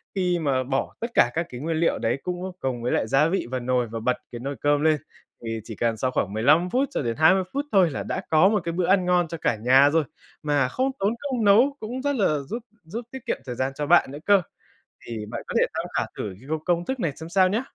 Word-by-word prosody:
Khi 180 -2 +1
mà 135 -4 0
bỏ 135 +1 -2
tất 235 +1 -4
cả 120 - +4
các 170 +1 -1
cái 125 0 -8
nguyên 160 +1 -1
liệu 165 +1 +1
đấy 115 +4 0
cũng 180 +1 -4
cùng 125 -3 -3
với 125 - 0
lại 110 - +1
gia 140 +6 +3
vị 180 -6 -1
vào 130 - -1
nồi 125 -1 0
và 115 +1 -5
bật 125 +3 0
cái 120 - -6
nồi 140 +3 -4
cơm 145 0 +2
lên, 155 -1 +3 0.5
thì 115 -1 -4
chỉ 115 -2 -8
cần 115 0 0
sau 130 +4 -1
khoảng 100 -5 -1
15 150 +11 +3
phút 265 +4 +1
cho - - -2
đến 115 -3 -2
20 185 +5 +5
phút 280 +1 -1
thôi 190 -4 +5
là - - -4
đã 190 - -3
có 160 +4 +5
1 210 -2 +1
cái 170 - -1
bữa 175 0 0
ăn 190 -1 +3
ngon 180 -1 +2
cho 165 - -6
cả 160 - 0
nhà 130 +6 +5
rồi 160 +1 +2 0.4
mà 145 -3 +2
không 260 - -1
tốn 200 +3 +1
công 260 -5 -2
nấu, 240 +8 +5
cũng 245 +4 -5
rất 285 0 0
là 170 - +2
giúp 230 - -5 0.2
giúp 225 +8 -6
tiết 265 -2 -9
kiệm - - -1
thời 125 - -5
gian 130 +2 -1
cho 150 - -2
bạn 170 -4 +4
nữa 145 - -7
cơ. 200 -2 +5 0.7
Thì 110 -2 -5
bạn - - -5
có - - -6
thể - - +5
tham - - -2
khảo - - 0
thử 100 -3 -4
cái 135 - -15
công 155 -1 -2
công 175 -1 +1
thức 260 +5 -3
này 165 - 0
xem 160 +1 -8
sao 185 +1 +4
nhá. 220 +6 0
160 Hz, 275 wpm, -24 LUFS, 130-190 Hz, 0.7 s, 20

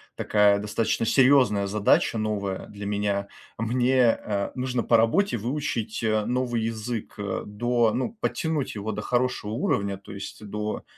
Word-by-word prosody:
такая 105 -1 +3
достаточно 110 +2 -1
серьезная 125 -7 +4
задача, 105 +3 +2
новая 100 -3 -2
для 100 0 -8
меня. 100 -1 -1 0.3
Мне, 125 +2 +3
а, 100 -3 -3
нужно 125 -2 -1
по 115 - +4
работе 120 - +2
выучить, 120 -2 -3
а, 110 -1 +1
новый 120 -1 -1
язык, 115 0 -4
э, 100 -2 -3
до, 120 +2 +1
ну, 130 - -2
подтянуть 160 - -1
его 105 +1 -3
до 105 0 -4
хорошего 125 -3 -1
уровня, 100 - -1
то 100 - -13
есть 100 +2 -8
до, 105 +1 -4
110 Hz, 150 wpm, -25 LUFS, 105-125 Hz, 0.3 s, серьезная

